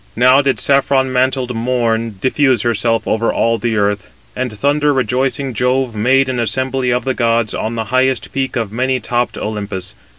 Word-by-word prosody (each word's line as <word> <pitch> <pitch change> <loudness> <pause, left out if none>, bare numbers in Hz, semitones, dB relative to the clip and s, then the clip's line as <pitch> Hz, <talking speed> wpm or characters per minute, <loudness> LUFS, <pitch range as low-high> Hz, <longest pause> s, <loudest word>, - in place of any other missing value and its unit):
Now 130 +4 +5
did 135 -1 0
saffron 135 -1 +2
mantled 130 -1 0
morn 115 -2 -1
diffuse 130 -1 +2
herself 115 -1 0
over 115 +1 +1
all 115 0 +1
the 115 +1 -1
earth, 100 -1 -1 0.3
and 130 -2 -2
thunder 145 +7 +1
rejoicing 130 +2 -1
Jove 125 +1 0
made 130 +5 +3
an 130 -2 -2
assembly 130 +3 -1
of 125 0 0
the 130 - 0
gods 115 -2 0
on 115 +2 -3
the 115 - -2
highest 130 -1 +1
peak 135 0 -2
of 115 -4 -2
many 130 +3 0
topped 120 +1 -2
Olympus. 100 -3 -4
125 Hz, 170 wpm, -16 LUFS, 115-130 Hz, 0.3 s, Now